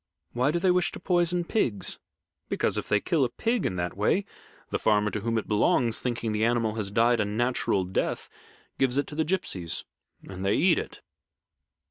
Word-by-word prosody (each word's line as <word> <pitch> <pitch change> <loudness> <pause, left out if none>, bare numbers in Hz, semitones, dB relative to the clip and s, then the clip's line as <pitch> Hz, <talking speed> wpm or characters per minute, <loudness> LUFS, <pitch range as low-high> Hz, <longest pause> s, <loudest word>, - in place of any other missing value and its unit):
"Why 125 +3 +2
do 165 - +1
they 180 +1 +3
wish 180 -2 +2
to - - -6
poison 175 -1 +1
pigs?" 120 - -1 0.5
"Because, - - 0
if - - -4
they 105 - +3
kill 155 - +1
a 125 - +1
pig 230 - 0
in 95 - -3
that 90 -1 -3
way, 110 - +1 0.5
the - - 0
farmer 105 -1 +2
to - - -2
whom 115 +2 -1
it 110 - -2
belongs, 110 +2 +2
thinking 120 -2 -2
the 105 +1 0
animal 115 -2 +1
has 105 -3 -3
died 115 +3 +3
a 105 - +2
natural 110 -2 0
death, 90 +1 -2 0.5
gives 130 -1 +2
it 145 - +2
to 150 - -9
the 160 - +1
gipsies 95 - -2 0.4
and 95 -1 -7
they 100 +1 +2
eat 175 +1 +4
it." - - -8
115 Hz, 195 wpm, -27 LUFS, 105-160 Hz, 0.5 s, eat